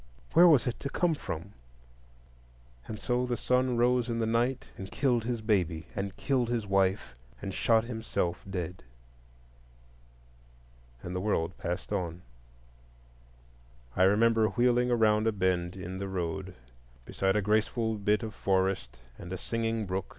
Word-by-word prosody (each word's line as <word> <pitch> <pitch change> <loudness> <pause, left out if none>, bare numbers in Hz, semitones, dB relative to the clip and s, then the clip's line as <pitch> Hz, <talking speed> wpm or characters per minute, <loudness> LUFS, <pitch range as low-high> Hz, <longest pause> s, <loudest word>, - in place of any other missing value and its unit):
Where 175 +2 +8
was 150 -7 +5
it 125 - -2
to 140 - -4
come 175 +3 +1
from? 100 - -6 1.3
And 110 - -6
so 125 0 0
the 120 -1 -1
son 125 +1 +1
rose 125 0 +2
in 115 - -1
the 115 - 0
night 120 +3 0
and 95 0 -8
killed 125 -5 +1
his 120 -2 -2
baby, 90 -7 0
and 100 0 -4
killed 125 -4 0
his 120 -3 -1
wife, 95 - +1 0.3
and 95 - -5
shot 115 +2 +3
himself 110 -7 -3
dead. 90 -1 -4 2.2
And 90 +1 -5
the - - 0
world 90 -4 0
passed 90 +4 -4
on. 90 -3 -3 1.7
I - - 0
remember 110 +3 +4
wheeling 120 +3 +2
around 110 -2 +3
a - - +4
bend 90 -3 0
in 95 0 -6
the 100 - -3
road 95 0 -3 0.5
beside 95 0 0
a 105 - +3
graceful 110 +1 +1
bit 105 +3 +1
of 110 -1 -5
forest 95 - 0 0.2
and 90 - -8
a 95 - -3
singing 115 +2 -2
brook. 95 0 -3
105 Hz, 150 wpm, -29 LUFS, 95-120 Hz, 2.2 s, Where